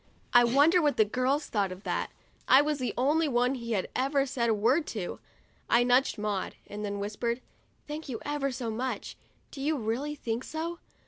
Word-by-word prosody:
I 245 - +8
wonder 290 +9 +5
what 295 -2 +2
the 215 - +5
girls 260 +7 0
thought 200 -3 -1
of 185 +2 -9
that; - - -2 0.4
I 260 - +8
was 295 0 +1
the 255 - -1
only 300 +6 +3
one 250 -1 +2
he 235 -3 -4
had 190 -3 0
ever 275 +1 +2
said 240 -3 -1
a - - +4
word 240 +9 +2
to. 200 -6 -4 0.5
I 235 +1 +5
nudged 250 +2 +3
Maud, 210 -2 -2
and 210 +1 -7
then 205 -1 -2
I - - -4
whispered, 215 +4 -2 0.5
"Thank 300 0 -6
you 240 - -3
ever 290 -2 -1
so 245 -3 -3
much. 250 +4 -3 0.4
Do 275 - -8
you 300 +2 +1
really 255 +6 -2
think 235 -3 -3
so?' 330 +4 -4
255 Hz, 200 wpm, -29 LUFS, 225-290 Hz, 0.5 s, I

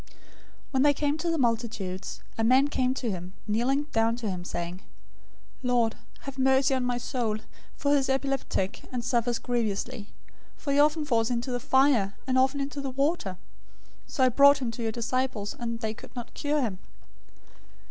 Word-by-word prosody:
017:014 - - -23 0.6
When 265 -2 +2
they 290 +1 +6
came 290 +1 0
to 340 +2 -1
the 330 - +1
multitude, 225 -7 -1 0.3
a 225 - -1
man 260 +5 +5
came 255 -2 +1
to 240 -5 -2
him, 180 0 -6
kneeling 245 +7 +1
down 225 0 +2
to 235 -3 -3
him, 180 -1 -4
saying, 175 0 -4
017:015 - - -18 0.8
"Lord, 245 -3 +2 0.3
have 275 -1 -7
mercy 265 +1 +4
on 260 -1 +1
my 245 -1 0
son, 230 -4 -2 0.3
for 285 - +1
he 290 - +5
is 270 0 -1
epileptic, 270 -7 -1
and 245 -2 -3
suffers 240 -1 +1
grievously; 230 -1 -2 0.5
for 280 - -2
he 285 - +3
often 300 +1 +4
falls 230 -5 +2
into 245 +1 -1
the 245 - -1
fire, 265 -6 +3
and 260 -1 +2
often 265 +2 +2
into 280 +1 -3
the 275 - -3
water. 275 - 0 0.7
017:016 - - -15
So 260 - +2
I 255 - +6
brought 280 +3 +7
him 255 -4 -2
to 230 - -7
your 225 -1 0
disciples, 235 -2 -2
and 230 -1 -3
they 220 -1 -1
could 230 - -13
not 240 -1 -7
cure 295 0 0
him." 195 -6 -3
250 Hz, 190 wpm, -28 LUFS, 225-275 Hz, 0.8 s, brought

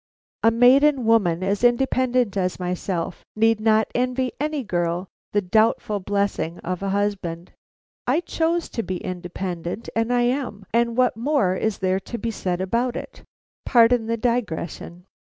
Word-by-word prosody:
A 225 - +5
maiden 255 +3 +5
woman, 190 -6 +3
as 200 +4 -1
independent 250 -2 +2
as 185 -2 -1
myself, 180 -1 -3
need 225 0 +3
not 220 0 +3
envy 255 0 0
any 300 -1 -1
girl 175 -2 -1 0.2
the 205 0 +1
doubtful 215 +1 +2
blessing 200 -4 -1
of 180 +1 -4
a 195 - -2
husband. 190 -4 -2 0.6
I 335 - +2
chose 335 0 -1
to 230 - -3
be 185 -4 -4
independent, 180 +2 -5
and 225 +1 0
I 245 0 +3
am, 240 -5 -2
and 235 0 +1
what 255 -3 +3
more 230 -6 +1
is 220 +1 -1
there 185 0 0
to 235 +5 -7
be 230 0 -3
said 180 -4 -2
about 235 +6 0
it? - - -7 0.4
Pardon 235 -1 +4
the 230 0 0
digression. 180 - -3
220 Hz, 150 wpm, -23 LUFS, 185-245 Hz, 0.6 s, A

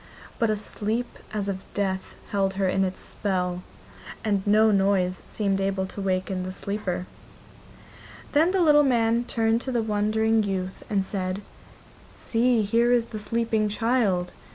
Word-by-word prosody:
But 230 -2 +2
a 215 - +1
sleep 220 +3 -3
as 210 -2 -2
of 195 -1 -2 0.2
death 190 -2 -2 0.2
held 195 -1 +1
her 195 -1 +1
in 190 +1 +2
its 185 0 -3
spell, 180 -3 -2 0.6
and 205 -3 +1
no 215 +1 +5
noise 195 -2 +2
seemed 195 -2 -1
able 195 -1 0
to 200 - -7
waken 185 0 -1
the 185 0 -4
sleeper. 190 -2 -3 1.3
Then 315 +4 +4
the 370 -1 +2
little 295 -2 +6
man 235 -3 +2
turned 225 -1 +1
to 260 - -4
the 235 -2 +1
wondering 220 +1 +2
youth 190 -2 -3
and 195 -2 +1
said: 190 0 -3 0.7
'See, 235 -1 +2
here 230 +4 +2
is 240 -2 +3
the 215 - -3
sleeping 225 -1 0
child! 210 -6 +1
205 Hz, 155 wpm, -25 LUFS, 190-230 Hz, 1.3 s, little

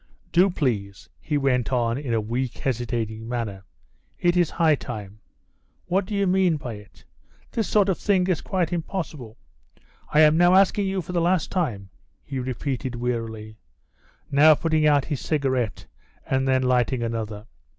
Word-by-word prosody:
"Do, 180 +3 +5
please," 105 - -2
he 150 -1 -1
went 125 -5 +1
on 120 -2 +1
in 135 -2 -4
a 115 - +2
weak, 120 +3 -3
hesitating 115 -3 -3
manner. 110 -6 -4 0.6
"It 175 0 +2
is 175 -3 +3
high 165 -2 +3
time. 105 -7 -6 0.7
What 185 +1 0
do 210 - -3
you 200 0 +1
mean 185 -3 +2
by 125 -5 -6
it? 105 -1 -14 0.5
This 225 -3 -1
sort 205 -2 +3
of 190 - 0
thing 190 -3 +2
is 180 -5 0
quite 180 -3 -1
impossible. 160 - -5 0.7
I 150 - +5
am 155 0 +6
now 175 +2 +5
asking 195 +1 +3
you 190 -1 -2
for 170 - -7
the 175 -1 0
last 175 0 +1
time," 110 - -2 0.3
he 135 -2 -5
repeated 130 0 -3
wearily, 115 -3 -4 0.7
now 150 +2 +7
putting 155 0 +1
out 145 -2 +3
his 145 -5 -3
cigarette 130 -8 -1 0.4
and 135 0 0
then 130 0 +2
lighting 125 -1 +1
another. 110 -2 -4
135 Hz, 160 wpm, -24 LUFS, 115-175 Hz, 0.7 s, now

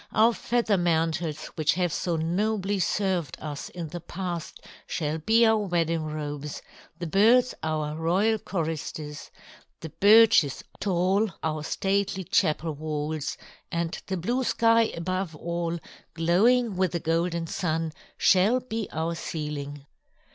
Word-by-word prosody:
Our 225 +2 +5
feather 230 -3 +1
mantles 165 -2 0
which 155 -1 +1
have 175 -3 0
so 175 -2 -1
nobly 195 +5 0
served 180 -6 0
us 145 -2 -6
in 170 -3 -6
the 175 +2 -6
past 175 -1 -5 0.3
shall 155 -1 -2
be 225 +8 +4
our 220 -1 +4
wedding 165 -5 0
robes; 150 -1 -5 0.3
the 175 - -4
birds 225 +9 +4
our 155 -1 -2
royal 190 +7 +1
choristers; 155 -4 -4 0.5
the 160 - -6
birches 210 - +5 0.2
tall 190 +3 +1
our 155 -1 -1
stately 195 +2 -1
chapel 155 -1 +1
walls, 150 0 -3 0.3
and 170 -1 -1
the 190 - -2
blue 240 +10 -1
sky 230 -1 +3
above 185 0 -2
all, 170 +1 -3 0.4
glowing 200 +7 +3
with 185 -2 +1
the 170 - 0
Golden 165 +1 0
Sun, 160 -2 -2 0.2
shall 200 +7 +4
be 225 -4 -4
our 160 +2 -2
ceiling. 145 -3 -5
170 Hz, 130 wpm, -26 LUFS, 155-200 Hz, 0.5 s, Our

